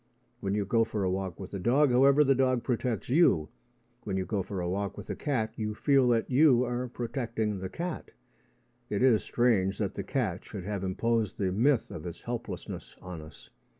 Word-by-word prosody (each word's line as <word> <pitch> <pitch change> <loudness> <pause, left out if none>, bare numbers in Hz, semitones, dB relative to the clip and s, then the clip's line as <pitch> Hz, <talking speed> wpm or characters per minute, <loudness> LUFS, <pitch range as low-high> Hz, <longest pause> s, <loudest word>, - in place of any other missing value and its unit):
When 100 0 -1
you 105 -1 0
go 115 +3 +3
for 110 -2 -3
a 95 - +1
walk 95 -2 -3
with 95 0 -8
a 100 - -3
dog, 130 +8 +3
however, 135 +4 +6
the 135 -1 +4
dog 130 -2 +1
protects 120 -3 -1
you: 125 - +3 0.5
when 95 -3 -2
you 95 - -1
go 100 -1 -1
for 95 +1 -5
a 90 - -2
walk 100 +2 -2
with - - -6
a - - -3
cat, 115 -7 -1
you 105 -1 -3
feel 135 +1 +3
that 115 -2 +2
you 130 -2 +5
are 125 +1 -2
protecting 115 -4 -3
the 95 0 -5
cat. 170 - -5 0.8
It 105 +4 0
is 120 -5 +5
strange 105 -6 +1
that 100 -4 -2
the - - -4
cat 105 -4 -2
should 100 -4 -7
have 100 0 -3
imposed 110 +2 0
the 95 -2 0
myth 120 +5 +2
of 80 +2 -6
its 85 - -8
helplessness - - -6
on 90 -3 -8
us. 75 +1 -14
110 Hz, 205 wpm, -29 LUFS, 95-125 Hz, 0.8 s, however